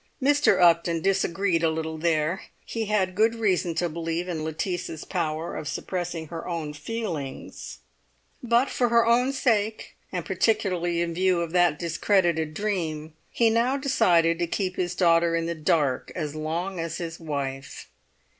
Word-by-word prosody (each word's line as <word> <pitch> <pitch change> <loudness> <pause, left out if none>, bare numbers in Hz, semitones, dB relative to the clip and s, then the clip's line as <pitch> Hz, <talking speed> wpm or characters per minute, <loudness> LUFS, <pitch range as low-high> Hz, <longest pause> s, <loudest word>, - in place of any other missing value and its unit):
Mr. 290 +2 +3
Upton 170 -1 +4
disagreed 195 -2 +1
a 165 - +3
little 160 0 -3
there; 160 +1 +1 0.2
he 225 -1 -3
had 200 -3 +1
good 220 +4 +3
reason 185 -6 0
to 175 - +1
believe 165 +2 -3
in 165 -3 -3
Lettice's 160 0 -4
power 165 -2 -2
of 150 - -5
suppressing 170 -1 -4
her 165 -1 -6
own 165 -4 -3
feelings; 165 -7 -5 0.6
but 240 +2 +3
for 245 -1 +1
her 235 0 +4
own 245 +3 +3
sake, 220 -5 0 0.2
and - - -3
particularly 180 -6 +1
in 170 -1 -1
view 180 0 +2
of 170 -1 -3
that 175 -4 +3
discredited 170 -2 +1
dream, 160 -7 -2 0.2
he 230 -1 +2
now 240 +4 +2
decided 170 - +3
to 175 - 0
keep 185 +1 -2
his 180 0 -2
daughter 170 -2 +3
in 165 0 0
the 170 - -1
dark 155 -5 0
as 150 -4 -3
long 165 +4 -3
as 165 0 -3
his 165 -1 -6
wife. 140 -4 -5
170 Hz, 155 wpm, -26 LUFS, 160-200 Hz, 0.6 s, Upton